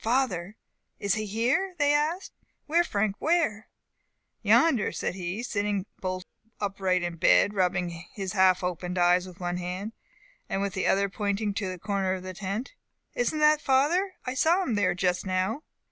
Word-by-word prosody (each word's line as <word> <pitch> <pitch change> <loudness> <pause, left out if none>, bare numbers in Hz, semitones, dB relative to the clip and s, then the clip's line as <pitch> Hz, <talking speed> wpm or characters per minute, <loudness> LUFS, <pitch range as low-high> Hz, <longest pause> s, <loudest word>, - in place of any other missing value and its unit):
Father! 220 -6 0 0.4
Is 200 -2 0
he 215 -1 -2
here?" 255 - 0
they 290 -1 +3
asked. 310 +6 0 0.3
"Where, 335 +3 +3
Frank? 205 - -1
where!" 310 -11 +1 0.7
"Yonder," 295 -10 +4
said - - -3
he, 185 +4 -4
sitting 205 -4 -1
bolt 185 -1 -3 0.3
upright 190 -3 0
in 175 -1 -3
bed, 190 +4 +4
rubbing 180 -3 -1
his 195 -2 -5
half 185 -2 +4
opened 180 0 -3
eyes 180 +1 +3
with 180 -1 -13
one 175 0 -2
hand, 180 +5 -4 0.6
and - - -1
with 200 -1 -2
the 190 - -1
other 200 +1 +3
pointing 205 +1 -2
to 195 -2 -2
a 185 - -6
corner 195 0 -1
of 185 - -8
the 185 0 -6
tent. 200 +7 -4 0.4
"Isn't 245 +6 0
that 300 0 +5
father? 335 +9 +2
I 255 - -2
saw 330 +8 +3
him 255 - -1
there 205 -4 +2
just 180 -1 0
now." 185 +8 0
200 Hz, 170 wpm, -27 LUFS, 185-250 Hz, 0.7 s, that